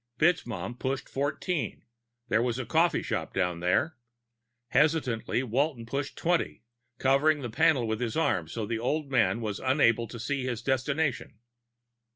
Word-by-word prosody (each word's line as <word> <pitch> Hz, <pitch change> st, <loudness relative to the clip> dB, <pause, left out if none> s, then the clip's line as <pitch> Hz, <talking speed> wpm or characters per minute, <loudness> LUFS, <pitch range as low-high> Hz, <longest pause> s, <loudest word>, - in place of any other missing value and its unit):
FitzMaugham 120 Hz, -, 0 dB
pushed 135 Hz, 0 st, -2 dB
Fourteen; 145 Hz, +4 st, -2 dB, 0.4 s
there 110 Hz, -1 st, +2 dB
was 120 Hz, -1 st, 0 dB
a 130 Hz, -, -3 dB
coffee 165 Hz, +2 st, +2 dB
shop -, -, -3 dB
down 90 Hz, -3 st, 0 dB
there. 90 Hz, -, +1 dB, 0.7 s
Hesitantly, 130 Hz, -4 st, +1 dB
Walton 130 Hz, 0 st, 0 dB
pushed 140 Hz, +4 st, -4 dB
twenty, 175 Hz, 0 st, 0 dB, 0.3 s
covering 140 Hz, +2 st, +3 dB
the 120 Hz, -, -4 dB
panel 135 Hz, -2 st, +3 dB
with 110 Hz, +1 st, -2 dB
his 120 Hz, +1 st, -2 dB
arm 95 Hz, -, +1 dB
so 110 Hz, +6 st, -4 dB
the 115 Hz, +1 st, -2 dB
old 140 Hz, +4 st, -1 dB
man 120 Hz, -2 st, +2 dB
would 105 Hz, -3 st, -2 dB
be -, -, -10 dB
unable 120 Hz, -4 st, +3 dB
to 120 Hz, -, -8 dB
see 135 Hz, +3 st, -2 dB
his 120 Hz, -3 st, -3 dB
destination. 135 Hz, -1 st, -1 dB
130 Hz, 155 wpm, -28 LUFS, 115-145 Hz, 0.7 s, covering